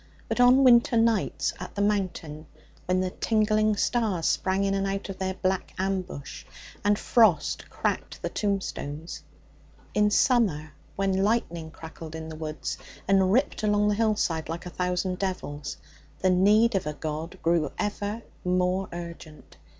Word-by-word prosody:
But -, -, -2 dB
on 250 Hz, +2 st, +6 dB
winter 240 Hz, -2 st, +6 dB
nights 225 Hz, -3 st, +1 dB
at -, -, -8 dB
the 200 Hz, -, -1 dB
mountain, 175 Hz, -7 st, -2 dB, 0.4 s
when 185 Hz, 0 st, +2 dB
the 185 Hz, -1 st, -1 dB
tingling 215 Hz, 0 st, +2 dB
stars 210 Hz, -9 st, 0 dB
sprang 190 Hz, +1 st, +1 dB
in 195 Hz, 0 st, +1 dB
and 195 Hz, 0 st, 0 dB
out 195 Hz, +1 st, -3 dB
of 190 Hz, -, -6 dB
their 190 Hz, 0 st, -2 dB
black 190 Hz, 0 st, -2 dB
ambush 185 Hz, -6 st, -3 dB, 0.4 s
and 205 Hz, 0 st, +3 dB
frost 210 Hz, -12 st, +2 dB
cracked -, -, -2 dB
the -, -, -3 dB
tombstones; 175 Hz, -6 st, -3 dB, 0.7 s
in 210 Hz, 0 st, +3 dB
summer, 200 Hz, -, +2 dB, 0.2 s
when 195 Hz, -1 st, +1 dB
lightning 170 Hz, -7 st, 0 dB
crackled 160 Hz, 0 st, -10 dB
in 160 Hz, 0 st, -6 dB
the 160 Hz, -, -7 dB
woods 155 Hz, -1 st, -5 dB, 0.3 s
and 190 Hz, -1 st, +4 dB
ripped 255 Hz, +3 st, +1 dB
along 210 Hz, -1 st, +2 dB
the -, -, +2 dB
hillside 205 Hz, -8 st, 0 dB
like 165 Hz, +2 st, -5 dB
a 180 Hz, -, -6 dB
thousand 180 Hz, +1 st, -1 dB
devils, 150 Hz, -7 st, -4 dB, 0.4 s
the 185 Hz, -, +2 dB
need 210 Hz, +6 st, +4 dB
of 190 Hz, -6 st, -1 dB
a 150 Hz, -, -2 dB
God 155 Hz, +4 st, -5 dB
grew 165 Hz, -3 st, +2 dB
ever 205 Hz, +2 st, -3 dB, 0.2 s
more 180 Hz, +1 st, +1 dB
urgent. 170 Hz, -3 st, -9 dB
190 Hz, 150 wpm, -27 LUFS, 165-210 Hz, 0.7 s, on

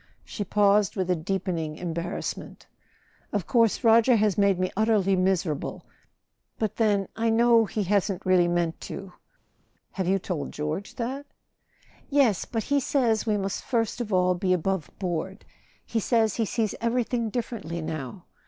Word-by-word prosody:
She 205 Hz, -, -4 dB
paused 205 Hz, 0 st, +3 dB
with 185 Hz, -2 st, -1 dB
a -, -, +3 dB
deepening 170 Hz, -2 st, -2 dB
embarrassment. 170 Hz, 0 st, -5 dB, 0.7 s
"Of 205 Hz, -5 st, -1 dB
course 230 Hz, -3 st, +2 dB
Roger 230 Hz, +2 st, +6 dB
has 210 Hz, -3 st, +2 dB
made 200 Hz, -2 st, +3 dB
me 185 Hz, 0 st, -1 dB
utterly 210 Hz, -2 st, +2 dB
miserable—but 185 Hz, +3 st, -4 dB
then 205 Hz, -4 st, +2 dB
I 230 Hz, 0 st, 0 dB
know 230 Hz, 0 st, +5 dB
he 215 Hz, -, -3 dB
really 190 Hz, -, -4 dB
hasn't 200 Hz, -2 st, 0 dB
meant 175 Hz, -2 st, +2 dB
to." 195 Hz, -2 st, -7 dB, 0.8 s
"Have 190 Hz, -3 st, -3 dB
you 195 Hz, +1 st, +3 dB
told 175 Hz, -6 st, -4 dB
George 155 Hz, +7 st, -4 dB
that?" 265 Hz, +4 st, -4 dB, 0.8 s
"Yes. 275 Hz, -, +3 dB
But 225 Hz, -2 st, -3 dB
he 285 Hz, 0 st, +1 dB
says 240 Hz, -5 st, +1 dB
we 210 Hz, -1 st, +2 dB
must 195 Hz, -1 st, -3 dB
first 230 Hz, -1 st, -1 dB
of 220 Hz, -3 st, -4 dB
all 180 Hz, -1 st, +3 dB
be 185 Hz, +1 st, +1 dB
above¬ 190 Hz, -1 st, -2 dB
board. 185 Hz, +2 st, -4 dB, 0.4 s
He 230 Hz, -, -1 dB
says 225 Hz, -1 st, +1 dB
he 225 Hz, -, +1 dB
sees 220 Hz, 0 st, -1 dB
everything 235 Hz, 0 st, 0 dB
differently 210 Hz, -7 st, -4 dB
now. 155 Hz, +2 st, -6 dB
200 Hz, 150 wpm, -26 LUFS, 180-225 Hz, 0.8 s, Roger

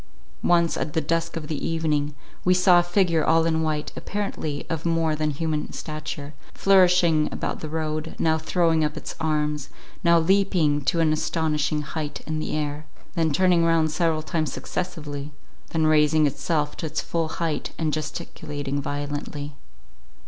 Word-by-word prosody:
Once, 170 Hz, -1 st, +3 dB
at 150 Hz, -, -3 dB
the -, -, +2 dB
dusk 165 Hz, +1 st, -1 dB
of 160 Hz, -, -5 dB
the 150 Hz, -2 st, -4 dB
evening, 150 Hz, -3 st, 0 dB, 0.3 s
we 180 Hz, 0 st, +4 dB
saw 180 Hz, -1 st, +6 dB
a -, -, +4 dB
figure 175 Hz, -2 st, +2 dB
all 165 Hz, 0 st, +4 dB
in 160 Hz, -1 st, +1 dB
white, 155 Hz, -1 st, -1 dB
apparently 180 Hz, -8 st, -3 dB
of 165 Hz, -1 st, -3 dB
more 165 Hz, -2 st, +1 dB
than 155 Hz, 0 st, 0 dB
human 155 Hz, +1 st, -2 dB
stature, 155 Hz, -1 st, -6 dB, 0.2 s
flourishing 180 Hz, -5 st, +4 dB
about -, -, -3 dB
the 155 Hz, -, -6 dB
road, 155 Hz, 0 st, -3 dB
now 160 Hz, -1 st, +2 dB
throwing 160 Hz, 0 st, +2 dB
up 150 Hz, 0 st, -1 dB
its -, -, -6 dB
arms, 150 Hz, -2 st, -1 dB, 0.3 s
now 170 Hz, -1 st, +6 dB
leaping 170 Hz, -4 st, +3 dB
to 165 Hz, +5 st, +1 dB
an 155 Hz, -1 st, +3 dB
astonishing 155 Hz, -1 st, 0 dB
height 145 Hz, +1 st, -5 dB
in 155 Hz, 0 st, -2 dB
the -, -, -3 dB
air, 150 Hz, 0 st, -3 dB, 0.3 s
then 165 Hz, -3 st, +1 dB
turning 180 Hz, +1 st, +4 dB
round 165 Hz, -2 st, +3 dB
several 160 Hz, -1 st, +1 dB
times 160 Hz, -1 st, -1 dB
successively, 150 Hz, -5 st, -4 dB, 0.4 s
then 160 Hz, -1 st, +1 dB
raising 155 Hz, 0 st, +4 dB
itself 150 Hz, +1 st, -1 dB
to 165 Hz, -, -4 dB
its 155 Hz, 0 st, -3 dB
full 165 Hz, -1 st, -1 dB
height 165 Hz, -1 st, -2 dB
and 155 Hz, -2 st, -1 dB
gesticulating 145 Hz, -2 st, -4 dB
violently. 145 Hz, +1 st, -4 dB
155 Hz, 160 wpm, -24 LUFS, 150-165 Hz, 0.4 s, saw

